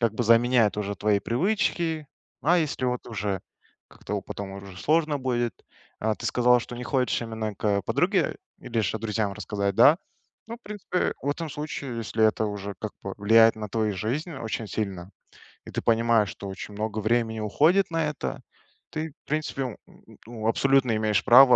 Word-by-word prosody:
как 115 -2 +1
бы 120 - 0
заменяет 115 -1 +4
уже 100 -1 -2
твои 105 -1 +2
привычки. 165 - 0 0.4
А 175 +4 +4
если 145 -5 -1
вот 125 0 -2
уже 100 -3 -2 0.5
как-то - - -7
у - - -2
потом 100 -1 -6
уже 100 -1 -9
сложно 155 +1 +2
будет. 120 -3 0 0.5
А 110 0 +1
ты - - -9
сказала, 125 0 +4
что 120 - -8
не 125 - -5
хочешь 130 -3 +1
именно 110 -2 -4
к 100 0 0
подруге 180 - +1 0.2
или 115 -2 -1
же 110 +1 -1
друзьям 105 -2 -1
рассказать, 100 -2 -2
да? 145 +9 +7 0.5
Ну 230 +1 -6
в 240 - -27
принципе, 205 -3 -2
в 145 - 0
этом 160 +1 -4
случае, 145 -4 -5
если 110 0 0
это 110 0 +1
уже 100 -1 -5
как 110 - -4
бы 100 - -5
влияет 115 +2 +6
на 105 -1 -5
твою 110 -1 0
жизнь 135 - -2
очень 115 -4 -4
сильно, 95 -3 -4 0.6
и - - -9
ты - - -2
понимаешь, 115 -2 +3
что 100 - -8
очень 95 +2 -7
много 110 +1 -2
времени 110 +1 +1
уходит 155 - +3
на 165 -1 +1
это, 150 - -5 0.5
ты, 155 0 -3
в - - -45
принципе, 150 -2 -1
н 125 -4 -5
н - - -19
ну 115 -2 -4
абсолютно 130 0 +3
имеешь 110 -1 +1
право 125 0 +9
115 Hz, 185 wpm, -26 LUFS, 105-140 Hz, 0.6 s, право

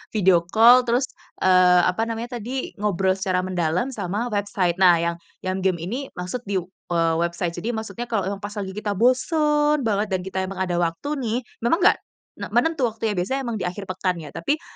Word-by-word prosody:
video 185 -4 +4
call 235 +4 +7
terus, 245 +2 +2 0.4
eee, 180 -1 +6
apa 220 +5 +1
namanya 235 +2 -4
tadi, 255 +4 -4
ngobrol 195 -2 +1
secara 185 -1 0
mendalam 180 +5 0
sama 210 +3 -3
website. 200 -4 0
Nah 180 -2 +7
yang 170 0 0 0.3
yang 185 +1 -1
game 185 -2 +1
ini 245 +11 -4
maksud 180 +7 -4
di, 200 -1 -1
eee, 170 -2 -2
website 170 0 -1
jadi 230 +7 -3
maksudnya 220 +1 -5
kalau 205 -5 0
yang 200 0 -5
pas 205 0 -6
lagi 190 -2 -4
kita 210 0 -3
bosen 295 - +2
banget 210 -1 +1
dan 185 - 0
kita 190 0 -6
emang 195 +1 -7
ada 180 -2 0
waktu 170 +11 -2
nih, 235 -3 -1 0.2
memang 235 +8 +2
enggak - - +5 0.4
enggak - - -7
menentu 320 -6 +2
waktunya 220 -1 -2
biasanya 260 +10 -1
emang 225 - -2
di - - -1
akhir 190 +3 -4
pekan 185 0 -1
ya, 150 - -9
tapi 295 - -2
200 Hz, 195 wpm, -23 LUFS, 180-235 Hz, 0.4 s, call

